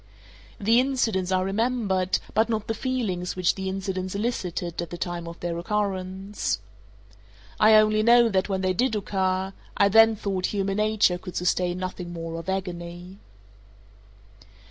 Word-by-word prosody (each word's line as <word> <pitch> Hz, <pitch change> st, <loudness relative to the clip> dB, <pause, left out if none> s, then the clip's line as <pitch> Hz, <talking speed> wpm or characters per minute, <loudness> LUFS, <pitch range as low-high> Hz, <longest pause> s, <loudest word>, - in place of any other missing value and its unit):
The 225 Hz, +4 st, +4 dB
incidents 230 Hz, -8 st, 0 dB
are 185 Hz, 0 st, +2 dB
remembered, 200 Hz, -3 st, 0 dB, 0.2 s
but 220 Hz, +1 st, +2 dB
not 220 Hz, -2 st, -1 dB
the 225 Hz, -, -2 dB
feelings 225 Hz, -7 st, -2 dB
which 185 Hz, -2 st, +2 dB
the 190 Hz, -1 st, -4 dB
incidents 190 Hz, -1 st, -3 dB
elicited 180 Hz, -6 st, -2 dB
at 170 Hz, -, -5 dB
the 175 Hz, -, -6 dB
time 175 Hz, -1 st, -4 dB
of 170 Hz, 0 st, -9 dB
their 175 Hz, -1 st, -2 dB
occurrence. 195 Hz, -, -2 dB, 1.0 s
I 215 Hz, 0 st, +7 dB
only 215 Hz, 0 st, +5 dB
know, 235 Hz, +1 st, +6 dB
that 190 Hz, -2 st, 0 dB
when 190 Hz, -1 st, -1 dB
they 185 Hz, -1 st, +1 dB
did 245 Hz, +4 st, +1 dB
occur, 190 Hz, -1 st, -1 dB, 0.2 s
I 200 Hz, -, +5 dB
then 225 Hz, +2 st, +6 dB
thought 195 Hz, -3 st, -2 dB
human 195 Hz, -1 st, -1 dB
nature 210 Hz, -4 st, +2 dB
could 180 Hz, -1 st, -9 dB
sustain 180 Hz, 0 st, 0 dB
nothing 185 Hz, -1 st, -5 dB
more 165 Hz, 0 st, -5 dB
of 165 Hz, -, -7 dB
agony. 180 Hz, 0 st, -5 dB
190 Hz, 150 wpm, -25 LUFS, 180-215 Hz, 1.0 s, I